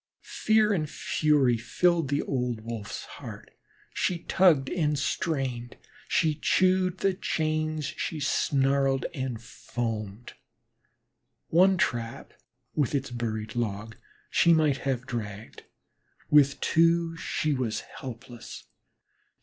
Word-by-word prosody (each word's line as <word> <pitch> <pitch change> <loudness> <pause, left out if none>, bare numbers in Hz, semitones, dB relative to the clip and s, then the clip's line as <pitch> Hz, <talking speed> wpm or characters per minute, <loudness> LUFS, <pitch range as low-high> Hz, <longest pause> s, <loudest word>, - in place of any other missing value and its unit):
Fear 215 -1 +2
and 155 -6 -1
fury 145 -8 +2
filled 165 +7 +1
the 145 +2 0
old 125 -4 -2
Wolf's 110 -3 -6
heart; - - -10 0.4
she 180 - 0
tugged 165 -8 +4
and 150 -3 0
strained, 135 -6 -2 0.3
she 155 -1 +2
chewed 185 +4 +2
the 195 0 +1
chains, 155 -4 -1
she 155 +2 -4
snarled 135 -1 +1
and 130 -6 -3
foamed. 115 -2 -5 1.2
One 185 +3 +5
trap 120 - -2 0.4
with 145 -2 0
its 135 -2 -2
buried 110 -2 -4
log, 110 -1 -3 0.4
she 170 - +5
might 155 -4 +3
have 130 -3 -2
dragged; 110 -4 -6 0.7
with 140 -2 +5
two, 165 0 +3
she 155 -2 -1
was 120 -5 -2 0.2
helpless. 125 -3 -9
140 Hz, 110 wpm, -27 LUFS, 120-160 Hz, 1.2 s, One